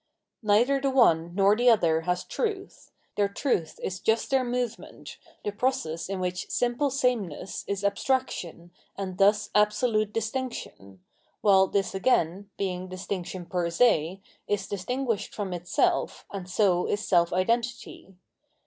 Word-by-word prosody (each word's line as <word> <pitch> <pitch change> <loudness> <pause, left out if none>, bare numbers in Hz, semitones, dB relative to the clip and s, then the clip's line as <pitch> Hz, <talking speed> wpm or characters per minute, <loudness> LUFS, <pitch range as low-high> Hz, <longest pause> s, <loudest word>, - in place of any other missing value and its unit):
Neither 240 +6 +3
the 275 - +1
one 175 -10 +3
nor 200 +1 +4
the 245 +2 +4
other 165 -8 +3
has 180 0 0
truth; 410 -4 -4 0.3
their 200 -1 +2
truth 200 - -1
is 185 0 -3
just 220 +5 0
their 265 -1 +3
movement, 245 -2 -5 0.3
the 205 - 0
process 205 -8 -2
in 195 -1 -3
which 180 0 -3
sinaple 245 +3 0
sameness 235 - -1
is 200 0 -3
abstraction 200 -6 -1 0.3
and 190 -2 -5
thus 205 +1 +3
absolute 215 0 +2
distinction, 220 - -5 0.4
while 190 -2 +5
tbiff 200 -1 0
again, 190 -2 +1
being 185 -2 -3
distmction 185 -1 -5
per 175 -1 -1
se, 180 -2 +2 0.3
is 205 -1 -1
distinguished 225 +2 -3
from 200 -4 -3
itself 175 0 0
and 190 -2 -6
so 185 -2 +2
is 205 +1 -2
self 170 -1 +3
identity. 230 0 -2
200 Hz, 135 wpm, -27 LUFS, 180-240 Hz, 0.4 s, while